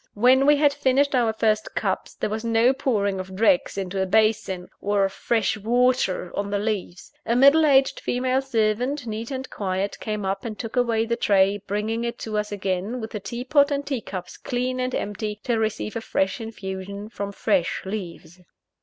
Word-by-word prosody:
When 255 +5 +5
we 295 0 +6
had 290 -1 +4
finished 280 +1 +2
our 240 -3 +3
first 215 -1 0
cups, - - -2
there - - -2
was 220 +1 -3
no 230 +2 +3
pouring 205 -8 0
of 185 0 -7
dregs 200 -2 +2
into 190 0 -2
a 190 - 0
basin, 205 -3 +1
or 205 -1 +1
of 195 - -3
fresh 220 -1 0
water 240 -4 +1
on 200 0 -2
the 205 - 0
leaves. 200 -3 -3
A 235 - 0
middle 280 +5 +6
aged 270 -1 +4
female 255 +1 0
servant, 245 +2 0
neat 225 +1 -4
and 265 -1 -4
quiet, 195 0 -2
came 210 -2 -3
up 195 +1 -2
and 220 -3 -5
took 225 0 -6
away 230 -2 +2
the 235 0 0
tray, 200 -2 +3
bringing 215 +3 -1
it 235 0 -3
to 220 -1 -5
us 210 0 -4
again 195 +4 -2
with 220 -1 -6
the 210 - -4
tea 235 +5 -5
pot 285 +2 +4
and 285 -1 -2
tea 270 -5 -2
cups 180 -3 -7
clean 255 +1 -2
and 255 0 -1
empty, 210 +1 -3
to 235 -2 0
receive 215 0 -2
a 230 - -2
fresh 190 -1 -1
infusion 200 -2 -6
from 200 -2 -5
fresh 195 -3 0
leaves. 180 -4 -6
220 Hz, 195 wpm, -24 LUFS, 200-250 Hz, -, we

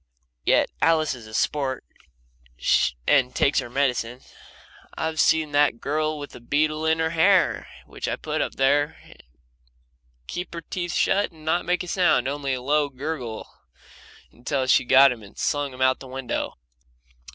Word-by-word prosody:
Yet - - +3
Alice 160 -2 +3
is 120 -4 -11
a 110 - -13
sport, 135 -1 -1 1.2
and 130 -3 +3
takes 140 - +3
her - - -5
medicine. 125 -2 -1 0.8
I've 160 0 -2
seen 160 -2 +3
that 145 -4 +2
girl 155 +3 -1
with 145 -1 -8
a - - -10
beetle 155 +5 0
in 160 0 +3
her 160 0 0
hair, 175 +1 +3 0.2
which - - -6
I - - -1
put - - -3
there, 145 +2 +2 1.3
keep 175 - -6
her 170 - -5
teeth 175 +1 -4
shut 200 0 +1
and 155 -2 -17
not 170 +2 0
make 180 +1 0
a - - -9
sound 170 -9 +2
only 140 -1 -2
a 125 - -7
low 145 +1 +1
gurgle 130 -4 -5 0.8
until 130 +3 -2
she'd 125 - +3
got 135 +2 +7
him 120 -2 -6
and 100 -2 -15
slung 145 -1 -1
him 130 0 -3
out 130 0 +3
of - - -33
the 135 - -10
window. 130 -1 -4
145 Hz, 165 wpm, -24 LUFS, 130-160 Hz, 1.3 s, got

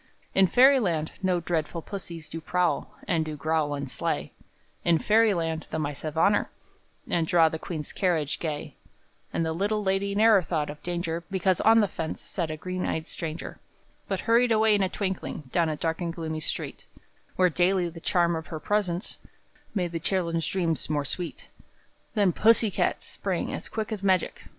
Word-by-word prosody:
In 195 -1 +5
Fairyland 205 - +4
no 185 -2 +2
dreadful 165 -1 -2
pussies 170 -5 -7
Do 165 - -6
prowl, 180 +1 0
and 165 -3 +2
do 155 -1 -5
growl 155 0 0
and 140 -1 -4
slay - - -3 0.5
In 170 -1 +4
Fairyland 175 -6 +2
the - - -3
mice 145 -2 -3
have 155 0 -5
honor, 200 +5 +3 0.6
And 165 -2 +1
draw 165 -1 +5
the 160 - -5
queen's 155 -4 -5
carriage 165 -7 0
gay; 155 -2 -4 0.5
And 165 - 0
the 160 - -1
little 205 +5 0
lady 195 +1 0
ne'er 215 -1 +6
thought 155 -4 -2
of 150 - -12
danger 170 -1 -3
Because 190 -1 +1
on 225 +1 +6
the 205 - +2
fence 160 -3 -4
sat 170 -4 -3
a 155 - -4
green 185 +3 -4
eyed 160 0 -1
stranger, 160 0 -5 0.5
But - - -2
hurried 235 +1 +3
away 220 -1 +5
in 205 - +3
a 190 - +2
twinkling 190 -5 -3
Down 170 -2 +2
a 155 - -1
dark 165 +2 -2
and 170 -1 -1
gloomy 160 -2 -4
street, 155 - -4 0.5
Where 185 -1 +4
daily 180 +2 +2
the 170 0 -8
charm 170 -2 +2
of 160 0 -5
her 160 - -5
presence 190 -1 -1 0.6
Made 180 -4 0
the 165 - -3
children's 165 -2 0
dreams 170 -6 -1
more 145 -2 0
sweet; 175 +4 -5 0.7
Then 200 -4 +4
Pussy 225 +2 +4
Cat - - 0
sprang - - -3
as - - -5
quick 220 0 -3
as 215 -3 -3
magic! 190 -3 +1
175 Hz, 180 wpm, -27 LUFS, 160-195 Hz, 0.7 s, ne'er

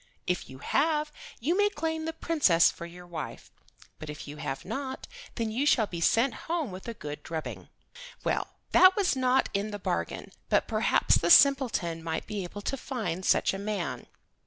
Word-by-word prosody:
If 180 - -2
you 130 - -10
have, 300 - +1 0.3
you 310 +9 +1
may 410 +1 +3
claim 320 -4 -3
the 325 - -2
Princess 295 - +3
for 170 - -8
your 175 +1 -12
wife, 175 -2 -7 0.5
but 155 - -8
if 150 0 -8
you 145 +1 -8
have 135 -2 -5
not, 260 +5 -5 0.3
then 225 -2 -2
you 265 +6 0
shall 230 -6 +4
be 170 -4 -6
sent 230 +8 +3 0.2
home 325 - -1
with 185 +4 -9
a 230 - -5
good 150 -5 -7
drubbing." 160 0 -6 0.5
Well, - - 0 0.2
that 370 0 +7
was 395 -8 +2
not 260 0 +2
in 200 +1 -1
the 205 - -5
bargain, 200 - -3 0.2
but - - +2
perhaps - - +3
the - - 0
simpleton 255 - +5
might 160 -1 -3
be 210 -3 -4
able 205 +3 -8
to 275 - -2
find 220 -9 -4
such - - +3
a 195 - -4
man. 195 - -3
215 Hz, 185 wpm, -28 LUFS, 170-280 Hz, 0.5 s, that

